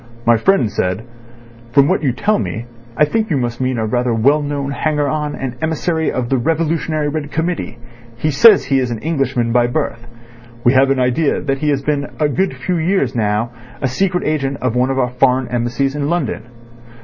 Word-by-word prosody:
My 120 0 +5
friend 120 - +2
said: 90 +4 -1 0.7
'From 140 -1 +5
what - - +1
you 140 -4 +1
tell 205 - 0
me 115 - -4 0.3
I 150 - +5
think 220 +7 -1
you 155 - +1
must 120 -1 -2
mean 130 -1 0
a 110 - -1
rather 120 +1 0
well 140 +7 +3
known 145 -1 -3
hanger 150 0 0
on 150 0 -2
and 130 -2 -5
emissary 160 0 0
of 125 -2 -2
the 135 - +1
Revolutionary 155 +1 0
Red 145 -1 -4
Committee. 160 -6 -2 0.4
He 155 +6 0
says 205 +8 +6
he 135 -1 +2
is 125 -2 -1
an 120 - -3
Englishman 130 -4 -1
by 120 0 +3
birth. 120 -3 -3 0.6
We 120 - +4
have 135 +1 +4
an 135 -1 +1
idea 130 +4 +1
that 135 -2 -2
he 150 +1 0
has 140 -1 0
been 145 -1 -1
for 155 - +1
a - - +2
good 190 +7 0
few 180 -2 -2
years 165 -5 +1
now 110 +1 0 0.3
a 135 - 0
secret 180 +8 0
agent 140 -3 -1
of 125 -2 -1
one 125 +1 +2
of 135 - -1
the 130 -2 +2
foreign 130 -1 +3
Embassies 120 +4 -1
in 145 0 -2
London. 175 -8 -2
140 Hz, 210 wpm, -17 LUFS, 125-155 Hz, 0.7 s, says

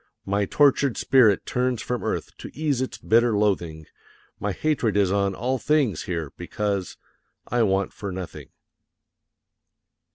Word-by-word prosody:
My 100 +1 0
tortured 140 +1 +3
spirit 120 -7 +4
turns 125 -1 0
from 120 -2 -3
earth, - - -3
to - - -8
ease 145 -4 0
its 130 -5 -3
bitter 115 0 +3
loathing; 85 -7 0 0.5
My 105 - -1
hatred 115 - 0
is 100 -2 +3
on 100 -1 +1
all 130 +5 -1
things 145 - +1
here, 85 -6 -3
because 100 -3 -3 0.5
I 120 +1 0
want 100 -2 +1
for 100 -2 -6
nothing. 90 -1 -7
105 Hz, 135 wpm, -24 LUFS, 95-125 Hz, 0.5 s, spirit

